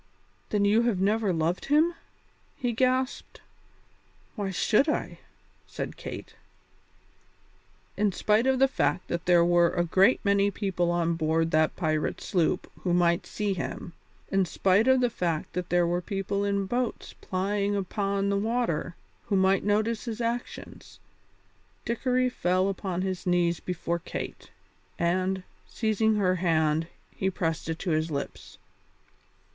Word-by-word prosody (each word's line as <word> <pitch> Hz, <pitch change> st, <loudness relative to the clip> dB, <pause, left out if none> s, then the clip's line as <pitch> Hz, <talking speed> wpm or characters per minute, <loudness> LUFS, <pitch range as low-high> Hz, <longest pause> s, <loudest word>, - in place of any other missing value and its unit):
"Then 205 Hz, -1 st, +1 dB
you 210 Hz, +3 st, +4 dB
have 235 Hz, -6 st, +1 dB
never 205 Hz, +1 st, +2 dB
loved 165 Hz, +1 st, -1 dB
him?" 310 Hz, +4 st, +3 dB, 0.6 s
he 245 Hz, -4 st, -2 dB
gasped. 255 Hz, +2 st, 0 dB, 1.0 s
"Why 205 Hz, -4 st, -2 dB
should 210 Hz, -, +2 dB
I?" -, -, -2 dB, 0.5 s
said -, -, -5 dB
Kate. -, -, -8 dB, 1.6 s
In 210 Hz, -1 st, +1 dB
spite 215 Hz, +6 st, +2 dB
of 265 Hz, 0 st, +3 dB
the 270 Hz, +1 st, +5 dB
fact 260 Hz, -7 st, -1 dB
that 170 Hz, 0 st, -3 dB
there 175 Hz, -1 st, +5 dB
were 175 Hz, 0 st, +4 dB
a 175 Hz, -, 0 dB
great 190 Hz, +7 st, +4 dB
many 200 Hz, 0 st, +3 dB
people 185 Hz, -3 st, -1 dB
on 170 Hz, -1 st, +1 dB
board 165 Hz, 0 st, 0 dB
that 155 Hz, 0 st, +2 dB
pirate 155 Hz, -3 st, -1 dB
sloop 175 Hz, -4 st, 0 dB
who 175 Hz, -2 st, 0 dB
might 170 Hz, 0 st, +2 dB
see 210 Hz, -2 st, -1 dB
him; 175 Hz, -1 st, -5 dB, 0.4 s
in 195 Hz, -1 st, +3 dB
spite 195 Hz, +6 st, +2 dB
of 260 Hz, -1 st, +5 dB
the 245 Hz, -, +3 dB
fact 170 Hz, -7 st, -2 dB
that 180 Hz, -1 st, -3 dB
there 175 Hz, 0 st, +3 dB
were 175 Hz, +1 st, 0 dB
people 195 Hz, +2 st, -2 dB
in 200 Hz, -1 st, 0 dB
boats 240 Hz, +4 st, -3 dB
plying 200 Hz, +2 st, -1 dB
upon 200 Hz, 0 st, -1 dB
the 200 Hz, -, +1 dB
water 220 Hz, -7 st, -1 dB, 0.3 s
who 205 Hz, -, 0 dB
might 190 Hz, 0 st, +3 dB
notice 215 Hz, +2 st, 0 dB
his 230 Hz, -1 st, -4 dB
actions, 235 Hz, +1 st, -5 dB, 0.9 s
Dickory 255 Hz, +2 st, +1 dB
fell 185 Hz, -5 st, +1 dB
upon 185 Hz, -2 st, -3 dB
his 190 Hz, -1 st, -3 dB
knees 175 Hz, -1 st, +2 dB
before 170 Hz, -1 st, -3 dB
Kate, -, -, -7 dB, 0.5 s
and, 185 Hz, +2 st, 0 dB, 0.2 s
seizing 220 Hz, -1 st, +1 dB
her 185 Hz, -3 st, +2 dB
hand, 160 Hz, -2 st, +1 dB, 0.2 s
he 190 Hz, -, -1 dB
pressed 165 Hz, -3 st, -2 dB
it 160 Hz, -, -2 dB
to 175 Hz, 0 st, -3 dB
his 155 Hz, +1 st, 0 dB
lips. 140 Hz, -2 st, -6 dB
190 Hz, 145 wpm, -27 LUFS, 175-215 Hz, 1.6 s, the